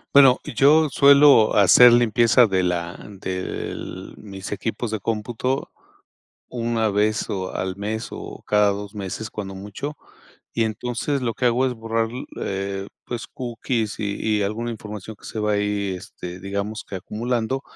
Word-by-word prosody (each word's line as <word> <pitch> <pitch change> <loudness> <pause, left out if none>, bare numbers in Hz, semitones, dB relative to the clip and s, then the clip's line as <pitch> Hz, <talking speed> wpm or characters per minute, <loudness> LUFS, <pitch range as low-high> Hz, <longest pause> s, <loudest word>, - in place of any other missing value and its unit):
Bueno, 135 -2 +8
yo 150 +6 +4
suelo 140 -5 +6
hacer 105 +5 +8
limpieza 120 0 +5
de 95 -2 +1
la 90 0 -1 0.2
del 95 -1 -5
mis 95 -2 -8
equipos 115 +2 -3
de 110 -2 -3
cómputo 115 +5 -2 0.8
1 115 -2 0
vez 105 +1 0
o 95 -2 -3
al 95 0 -3
mes 110 +3 -3
o - - -8
cada 105 -1 +4
2 100 +1 -4
meses 105 +2 -5
cuando 95 -2 -6
mucho. 105 +10 -6 0.6
Y 115 - +2
entonces 120 +5 -2
lo 120 -2 0
que 125 - 0
hago 120 +2 +3
es 130 - 0
borrar 115 0 -1
l 125 +3 -6 0.2
eh, 95 0 -3 0.2
pues 120 -2 -4
cookies 120 -3 -3
y 100 -1 -3 0.2
y - - +1
alguna 110 +4 -2
información 105 -1 -8
que - - -20
se - - -6
va 105 0 +1
ahí, 100 -1 0
este, 90 -1 -9
digamos 100 +3 -4
que 100 - -6
acumulando, 120 +6 -2
110 Hz, 155 wpm, -23 LUFS, 100-120 Hz, 0.8 s, Bueno